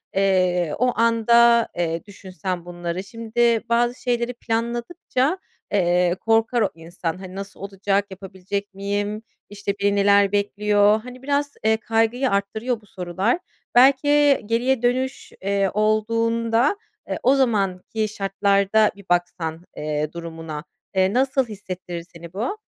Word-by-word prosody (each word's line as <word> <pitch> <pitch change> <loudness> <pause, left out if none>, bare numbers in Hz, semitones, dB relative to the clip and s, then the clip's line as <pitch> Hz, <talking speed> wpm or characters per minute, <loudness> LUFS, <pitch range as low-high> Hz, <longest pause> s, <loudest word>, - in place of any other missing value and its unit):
eee, 185 -4 +2
o 250 0 +2
anda, 235 0 +5
eee, 165 -1 -1
düşünsen 185 -2 -6
bunları, 175 +1 -4
şimdi 230 +1 0
bazı 240 +1 +1
şeyleri 240 0 -1
planladıkça, 240 +7 -1 0.3
eee, 180 -2 +2
korkar 225 +1 +2
o 205 - +2
insan, 165 +1 -5
hani, 185 0 -9
"Nasıl 195 0 -8
olacak, 200 +1 -1
yapabilecek 195 +1 -6
miyim?", 205 +2 -3 0.3
işte, 200 -1 -3
"Beni 200 0 +2
neler 200 0 +4
bekliyor?" 205 +1 +2
hani, 250 +1 -11
biraz, 285 0 0
eee, 220 0 +3
kaygıyı 225 +3 +1
arttırıyor 220 +4 -1
bu - - -21
sorular. 190 - -1 0.4
Belki, 265 +3 +6
eee, 290 -2 +4
geriye 240 +3 +1
dönüş, 255 +2 -1
eee, 195 0 +1
olduğunda, 230 - +1 0.3
eee, - - -2
o 265 +3 +5
zamanki 215 -3 0
şartlarda 200 +1 +2
bir 200 -1 -15
baksan, 175 -2 -1
eee, 150 0 -2
durumuna, 165 -2 -7 0.3
eee, 190 +2 +3
nasıl 265 0 +2
hissettirir 185 -4 -7
seni 170 +1 -11
bu? 240 - -2
205 Hz, 130 wpm, -22 LUFS, 185-235 Hz, 0.4 s, Belki